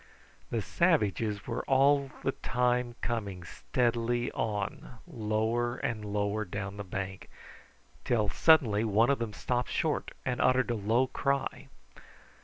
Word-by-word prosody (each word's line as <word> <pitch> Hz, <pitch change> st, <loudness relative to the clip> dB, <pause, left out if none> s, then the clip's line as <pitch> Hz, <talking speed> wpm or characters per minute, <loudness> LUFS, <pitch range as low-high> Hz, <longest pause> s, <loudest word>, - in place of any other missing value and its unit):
The -, -, -1 dB
savages 105 Hz, 0 st, +1 dB
were 115 Hz, -, -3 dB
all 140 Hz, +1 st, +4 dB
the 135 Hz, -, +1 dB
time 125 Hz, -1 st, 0 dB
coming 100 Hz, -6 st, -3 dB
steadily 120 Hz, +5 st, -1 dB
on 105 Hz, +2 st, -3 dB
lower 115 Hz, -2 st, -1 dB
and 110 Hz, -2 st, -3 dB
lower 105 Hz, +1 st, -1 dB
down 100 Hz, +1 st, -5 dB
the 100 Hz, -, -4 dB
bank, 95 Hz, 0 st, -5 dB, 0.7 s
till 110 Hz, -4 st, +1 dB
suddenly 120 Hz, -7 st, +4 dB
one 110 Hz, +3 st, +3 dB
of 140 Hz, -, 0 dB
them 115 Hz, -2 st, -2 dB
stopped 125 Hz, +3 st, -2 dB
short -, -, -1 dB, 0.2 s
and 125 Hz, -1 st, -1 dB
uttered 130 Hz, -1 st, +3 dB
a -, -, 0 dB
low 110 Hz, +5 st, +2 dB
cry. 140 Hz, +1 st, -2 dB
115 Hz, 130 wpm, -30 LUFS, 105-125 Hz, 0.7 s, all